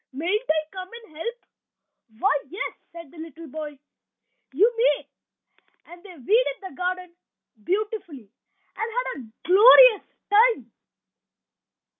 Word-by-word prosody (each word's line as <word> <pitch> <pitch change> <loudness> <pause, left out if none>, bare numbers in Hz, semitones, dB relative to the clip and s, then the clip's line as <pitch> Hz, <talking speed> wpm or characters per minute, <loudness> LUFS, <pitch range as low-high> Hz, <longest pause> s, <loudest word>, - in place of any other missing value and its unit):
Mayn't 365 - -2
I 315 0 +2
come 370 -1 -8 0.2
and 310 - -22
help?" 465 +10 -5 0.8
"Why, 255 - +2
yes," 380 +4 -5 0.2
said 335 -4 -12
the 335 - -15
little 325 0 -10
boy. 300 0 -8 0.7
"You 415 - +3
may." 470 +2 +1 0.8
And 345 0 -14
they 375 -2 -13
weeded 445 - +1
the 380 -2 -9
garden 365 -1 -4 0.5
beautifully, 375 - -4 0.4
and 450 +1 -4
had - - -2
a 255 - -9 0.2
glorious 440 +4 +7 0.3
time. 415 - +3
365 Hz, 120 wpm, -24 LUFS, 315-440 Hz, 0.8 s, glorious